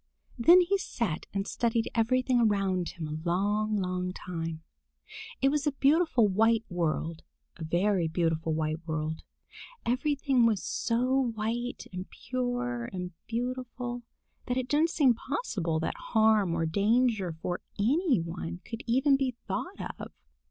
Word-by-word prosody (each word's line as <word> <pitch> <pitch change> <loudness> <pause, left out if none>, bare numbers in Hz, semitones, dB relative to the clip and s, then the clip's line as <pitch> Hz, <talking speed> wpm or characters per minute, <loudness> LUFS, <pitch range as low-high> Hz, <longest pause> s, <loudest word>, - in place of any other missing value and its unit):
Then 340 +10 +7
he 390 +3 +1
sat 220 - -3
and 195 0 -2
studied 230 -1 0
everything 250 +2 +2
around 195 -5 +1
him 160 -3 -6
a 155 +1 -4
long, 205 +5 +1
long 180 -1 -2
time. 165 -3 -5 0.8
It 270 - +6
was 295 +1 0
a 295 - +1
beautiful 280 -4 +3
white 225 +3 +3
world, 165 -1 -1 0.4
a 165 - -6
very 175 +2 +1
beautiful 165 -1 0
white 155 0 -1
world. 155 0 -2 0.6
Everything 260 0 +2
was 215 -4 0
so 250 +2 +1
white 235 +3 -3
and 185 +1 -6
pure 245 -1 -3
and 180 -1 -5 0.2
beautiful 245 0 -3 0.5
that 250 0 0
it 255 -1 -1
didn't 305 +5 +3
seem 280 -7 +4
possible 205 - -2
that - - -1
harm 215 -6 +3
or 165 -1 0
danger 205 +1 +2
for 175 +2 -3 0.2
any 265 - +2
one 85 - -5
could 230 +1 -6
even 265 +4 +4
be 260 -3 -1
thought - - -4 0.2
of. - - -7
220 Hz, 140 wpm, -29 LUFS, 175-250 Hz, 0.8 s, Then